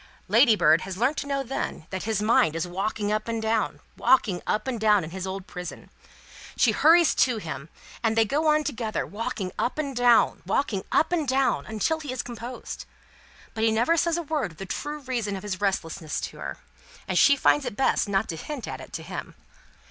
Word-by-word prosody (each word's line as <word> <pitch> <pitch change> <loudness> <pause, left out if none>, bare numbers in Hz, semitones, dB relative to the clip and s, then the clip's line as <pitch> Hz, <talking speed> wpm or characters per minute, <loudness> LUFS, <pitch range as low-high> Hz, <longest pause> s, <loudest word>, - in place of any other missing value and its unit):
Ladybird 210 - +5
has 190 -1 -6
learnt 260 +7 +1
to 285 - -3
know 275 -1 -1
then 250 -10 -4
that 190 +1 -4
his 215 -2 0
mind 210 -8 +3
is 165 +2 -2
walking 205 +3 -2
up 215 +1 -1
and 230 -1 -2
down, 220 0 0 0.2
walking 205 -9 +3
up 215 - 0
and 250 -3 -2
down, 210 -3 +4
in 160 - -7
his 190 +1 -5
old 190 0 -5
prison. 180 -3 -8 0.7
She - - +4
hurries 330 +1 +5
to 250 -3 +2
him, 155 -6 -6 0.3
and 225 -1 +1
they 225 - +5
go 300 +8 0
on 305 0 +4
together, 230 -7 -2
walking 205 -3 -4
up 245 - -1
and 280 -3 -3
down, 245 -1 +4
walking 220 -9 0
up 320 - +3
and 325 -5 0
down, 265 +1 +1
until 220 +9 0
he 290 -4 -6
is 255 -1 -3
composed. 240 +1 -7 0.7
But 220 - -2
he 225 - +5
never 235 +9 +3
says 335 0 +1
a 340 - -2
word 295 - -2
of - - -22
the 195 - -6
true 295 +8 -4
reason 235 -6 -2
of 190 - -7
his 200 -2 -4
restlessness, 170 -5 -2
to - - -6
her, - - -5 0.5
and - - -2
she 280 - +6
finds 290 +1 +3
it 245 - -4
best 265 -5 +2
not 200 +2 +1
to 165 - -3
hint 280 - -6
at - - -6
it - - -12
to - - -5
him. - - -7
225 Hz, 210 wpm, -26 LUFS, 195-270 Hz, 0.7 s, she